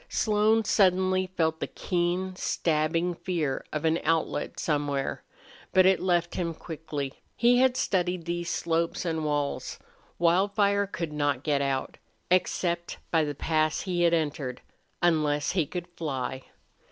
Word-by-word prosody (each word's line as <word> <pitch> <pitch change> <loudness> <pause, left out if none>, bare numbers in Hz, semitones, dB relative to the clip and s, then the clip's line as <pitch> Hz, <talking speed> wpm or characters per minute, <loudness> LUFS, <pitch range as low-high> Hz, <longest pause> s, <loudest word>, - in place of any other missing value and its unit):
Slone 215 +1 +2
suddenly 185 -2 +3
felt 160 -3 0
the - - -2
keen, 180 +1 -1
stabbing 165 +1 0
fear 165 -6 -2
of 155 +1 -2
an 160 +1 +2
outlet 165 -1 0
somewhere. 145 -3 -1 0.5
But 185 0 +6
it 190 -1 +5
left 175 -2 +1
him 170 -2 -2
quickly. 155 -5 -6
He 245 +1 +4
had 260 0 +3
studied 180 -2 0
those 175 0 -2
slopes 165 +1 -1
and 160 -2 -1
walls. 145 -1 -2 0.4
Wildfire 200 +4 +2
could 170 -5 -4
not 145 -3 0
get 145 -2 +1
out, 135 -1 -2 0.3
except 175 -1 0
by 160 -2 +3
the 145 -1 -3
pass 155 +1 +1
he 180 -2 -1
had 170 -1 +4
entered, 145 -5 -2 0.4
unless 150 -4 +2
he 170 -6 +1
could 175 +2 -5
fly. 130 -6 -4
170 Hz, 140 wpm, -27 LUFS, 150-185 Hz, 0.5 s, But